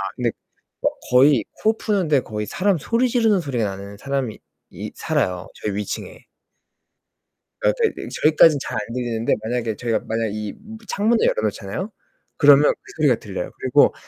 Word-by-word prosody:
근데 120 -2 0 0.5
막 - - +2 0.2
거의 130 -1 +5
코 220 +1 0
푸는데 180 - +1
거의 105 -2 -4
사람 185 - +1
소리 235 - +1
지르는 225 -5 +3
소리가 130 -8 -1
나는 100 0 -6
사람이 135 -2 -3 0.3
이 - - -7
살아요, 90 -1 -1
저희 105 -2 -4
위층에. 105 -1 -5 1.4
아 - - +4
네, 450 - +3
네 - - -7
저희까진 155 -1 +6
잘 - - -4
안 105 +2 -6
들리는데 120 -2 -1
만약에 115 -1 -2
저희가 115 +1 -1
만약에 115 0 -1
이 105 0 -4
무 220 +2 -11
창문을 225 +3 +2
열어 - - +1
놓잖아요? 110 - -3 0.5
그러면 145 0 +7
그 410 - -14
소리가 - - +4
들려요. - - -6
그리고 - - +4
125 Hz, 345 characters per minute, -22 LUFS, -, 1.4 s, 그러면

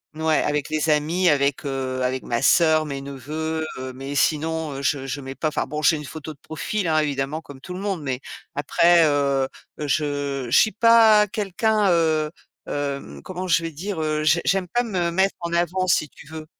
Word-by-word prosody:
N 160 - -7
ouais, 160 -1 +3
avec 150 -1 -1
les 155 +1 0
amis, 165 +4 +2
avec, 140 0 +1
heu, 130 -1 -3
avec 130 +1 -1
ma 120 +1 -2
soeur, 155 +2 +4
mes 140 -2 -5
neveux, 155 +4 -4
heu, 130 0 -6
mais 135 +2 -6
sinon, 155 +1 0
heu, 135 - -6
je 135 -1 0
je 135 +2 -4
mets 135 0 -7
pas, 155 - -1
enfin - - -2
bon, 150 +2 -4
j'ai 160 +2 +4
une 150 - -6
photo 155 +1 -8
de 140 - -26
profil, 180 +4 -3
hein, 155 -1 +2
évidemment, 145 +1 -2
comme 135 -4 -13
tout 180 - -8
le 185 - -6
monde. 195 -5 -2
Mais 130 -3 -3 0.4
après, 170 +4 +4
heu, 140 -2 +1 0.3
je 145 -2 -2
je 125 - +4
suis 220 - +5
pas 220 -2 +6
quelqu'un, 210 0 +1
heu, 160 -2 +2 0.4
hem, 140 -1 -4
comment 185 0 -5
je 165 -1 +3
vais 165 - -4
dire? 175 +2 -4
Heu, 155 0 -1
je 160 +2 +4
j'aime 195 -2 +1
pas 245 0 +1
me 180 -6 -1
mettre 190 +3 +1
en 170 0 -4
avant, 175 +2 0
si 155 -4 +2
tu - - -16
veux. 160 0 -8
155 Hz, 210 wpm, -23 LUFS, 140-175 Hz, 0.4 s, pas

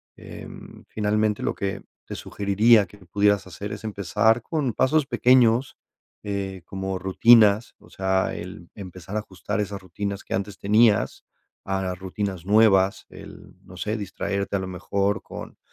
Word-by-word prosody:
em, - - -11
finalmente, 105 0 0
lo - - 0
que 100 -1 -4 0.2
te - - -7
sugeriría 105 +2 +3
que 105 - -17
pudieras 100 +2 +2
hacer 100 +4 -7
es 105 - -8
empezar 110 +2 +1
con 140 -4 -2
pasos 150 +5 +2
pequeños, 125 -1 +3 0.5
eh, 95 -3 -4
como 95 -1 -4
rutinas, 105 +3 +5
o - - -19
sea, 95 0 0
el 85 +1 -9
empezar 95 -1 -9
a - - +1
ajustar 95 0 -4
esas 100 -1 -5
rutinas 100 +2 -5
que - - -5
antes 100 0 -3
tenías 105 0 +2 0.4
a 95 0 -2
las 90 -1 -3
rutinas 95 -2 -4
nuevas, 100 -2 +4
el - - -13
no 90 - -13
sé, 105 +3 -2
distraerte 100 0 -3
a - - -3
lo 95 - -4
mejor 100 +2 -1
con - - -9
100 Hz, 155 wpm, -24 LUFS, 95-110 Hz, 0.5 s, rutinas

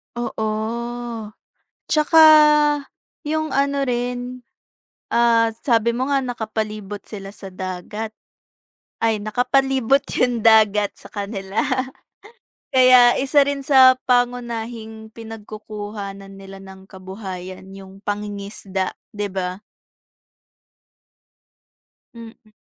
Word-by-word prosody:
Oo. 220 -2 -2 1.3
Tsaka, 315 +1 +4 1.1
yung 315 0 -1
ano 280 0 +1
rin, 245 0 -3 0.7
ah, 230 -1 +3
sabi 235 -3 +3
mo 250 +3 -2
nga, 275 -1 +2
nakapalibot 215 -4 -4
sila 195 -2 -9
sa 195 -2 -10
dagat. 185 +4 -6 0.9
Ay, 225 -2 +2
nakapalibot 265 +3 +2 0.2
yung 245 -3 +1
dagat 215 -2 +4
sa - - -14
kanila. 200 -1 -3 1.1
Kaya 255 -1 +7
isa 280 +2 +3
rin 285 -1 -2
sa 260 -2 +7
pangunahing 235 -3 -2
pinagkukuhanan 210 -3 -8
nila 195 0 -11
ng 190 0 -13
kabuhayan, 190 -1 -8
yung 195 0 -13
pangingisda, 200 -2 -4 0.2
'di 205 -1 -3
ba? 185 0 -4 2.6
Mm. 225 -1 -13
220 Hz, 85 wpm, -21 LUFS, 200-245 Hz, 2.6 s, Kaya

